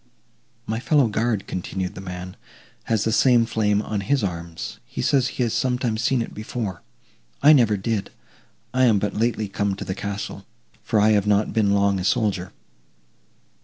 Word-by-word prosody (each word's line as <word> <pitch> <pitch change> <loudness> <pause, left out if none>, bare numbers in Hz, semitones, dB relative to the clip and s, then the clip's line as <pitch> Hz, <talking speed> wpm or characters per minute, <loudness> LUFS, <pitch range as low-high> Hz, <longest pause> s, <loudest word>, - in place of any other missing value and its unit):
"My 110 +1 -2
fellow 135 +1 +3
guard," 110 -2 -1
continued 95 +1 -4
the 95 - -8
man, 90 0 -7 0.5
"has 110 -3 +1
the 110 - 0
same 120 0 +4
flame 105 -2 +1
on 105 -2 -3
his 135 +3 0
arms; 85 -3 -5
he - - -10
says 135 -3 +2
he 125 - -2
has 115 - -1
sometimes 125 -3 0
seen 120 0 +1
it - - -9
before. 105 -4 -5 0.6
I 150 +2 +9
never 115 -7 +4
did; 105 0 -2 0.6
I 130 0 +4
am 110 -4 +4
but 100 +1 -1
lately 110 -1 0
come 100 0 -1
to - - -7
the 95 - -2
castle, 100 0 -5 0.3
for 110 - +1
I 105 +1 +5
have 105 -1 +2
not 105 +1 +2
been 105 -3 +2
long 100 -1 +2
a - - -3
soldier." 95 -2 0
105 Hz, 175 wpm, -23 LUFS, 100-115 Hz, 0.6 s, I